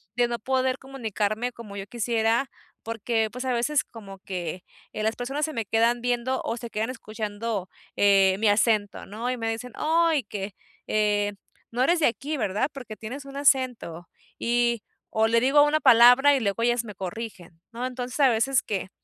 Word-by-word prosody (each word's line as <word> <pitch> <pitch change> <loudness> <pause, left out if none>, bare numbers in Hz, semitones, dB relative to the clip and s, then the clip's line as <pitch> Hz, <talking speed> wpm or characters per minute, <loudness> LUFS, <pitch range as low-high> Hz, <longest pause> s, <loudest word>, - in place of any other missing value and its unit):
de 240 0 +3
no 235 0 -3
poder 260 +2 0
comunicarme 235 -3 -2
como 220 -4 -11
yo 195 0 -6
quisiera 235 +2 0 0.3
porque, 225 0 -1
pues, 250 +2 -6
a 255 - 0
veces 260 +5 +1
como 195 -4 -11
que, 180 -2 -5 0.3
eh, - - -5
las 220 +1 0
personas 270 +5 -3
se 310 - -6
me 225 -4 -2
quedan 230 +3 +2
viendo 245 +1 0
o 230 - -2
se 235 0 -7
quedan 220 +2 -2
escuchando, 215 -3 -4 0.3
eh, 195 -2 +5
mi 220 - +2
acento, 205 -1 +1
¿no? 230 +5 -3
Y 250 - -3
me 225 -1 -2
dicen: 225 +2 -5
"Ay, 320 -3 +2
que, 200 -1 -6 0.3
eh, 205 -1 +1 0.4
no 245 +2 -1
eres 340 +5 +3
de - - +5
aquí, 280 +6 -3
¿verdad?, 210 +4 0
porque 250 -6 -8
tienes 260 +6 -7
un 275 0 -9
acento", 250 - +1 0.3
y 235 -2 +1 0.3
o 220 0 +4
le 230 +1 +3
digo 270 +4 +5
una 295 +1 +2
palabra 250 +3 +7
y - - +1
luego 205 +1 -1
ellas 240 0 +2
me 210 -4 -9
corrigen, 185 -3 -7
¿no? 240 +2 -4
Entonces 255 +1 -5
a 275 -3 +6
veces 245 +3 +2
que 195 -3 -3
230 Hz, 185 wpm, -25 LUFS, 210-255 Hz, 0.4 s, palabra